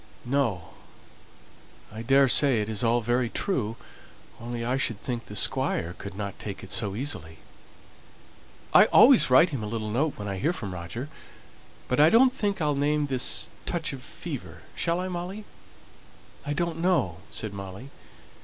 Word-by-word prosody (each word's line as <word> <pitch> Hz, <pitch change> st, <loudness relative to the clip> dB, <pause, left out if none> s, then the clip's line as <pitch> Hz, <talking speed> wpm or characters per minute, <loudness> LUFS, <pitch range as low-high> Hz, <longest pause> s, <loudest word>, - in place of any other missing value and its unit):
"No. 120 Hz, -, -1 dB, 1.2 s
I 110 Hz, -, -6 dB
daresay 135 Hz, 0 st, +4 dB
it 105 Hz, 0 st, -2 dB
is 110 Hz, 0 st, -1 dB
all 120 Hz, +1 st, +2 dB
very 120 Hz, +1 st, 0 dB
true; 115 Hz, -, -2 dB, 0.6 s
only 120 Hz, 0 st, -5 dB
I 125 Hz, +2 st, 0 dB
should 120 Hz, -6 st, -1 dB
think 120 Hz, -1 st, -4 dB
the 105 Hz, -, -9 dB
Squire 85 Hz, -3 st, 0 dB
could 100 Hz, +3 st, -9 dB
not 100 Hz, 0 st, -5 dB
take 100 Hz, -2 st, -6 dB
it 95 Hz, -, -9 dB
so 105 Hz, -4 st, 0 dB
easily." 105 Hz, -, -1 dB, 1.4 s
"I -, -, +8 dB
always 255 Hz, -, +6 dB
write 155 Hz, +7 st, +6 dB
him 135 Hz, -6 st, -3 dB
a 105 Hz, -, -4 dB
little 110 Hz, -1 st, -4 dB
note 145 Hz, +7 st, 0 dB
when 105 Hz, -, -6 dB
I 100 Hz, -1 st, -3 dB
hear 160 Hz, -, +1 dB
from 100 Hz, -, -6 dB
Roger, 90 Hz, -, -6 dB, 0.8 s
but 125 Hz, -, 0 dB
I 150 Hz, +2 st, +7 dB
don't 250 Hz, +5 st, +5 dB
think 205 Hz, -5 st, -1 dB
I'll 150 Hz, -2 st, +1 dB
name 145 Hz, +1 st, +1 dB
this 130 Hz, -3 st, 0 dB, 0.2 s
touch 165 Hz, -4 st, -2 dB
of 135 Hz, -, -8 dB
fever -, -, -8 dB
shall 170 Hz, +1 st, -1 dB
I, 185 Hz, -, -2 dB
Molly?" 185 Hz, +4 st, -5 dB, 1.0 s
"I 145 Hz, -, 0 dB
don't 170 Hz, +1 st, -2 dB
know," 165 Hz, -, +1 dB
said 110 Hz, -2 st, -6 dB
Molly. 100 Hz, +7 st, -8 dB
125 Hz, 165 wpm, -26 LUFS, 105-150 Hz, 1.4 s, I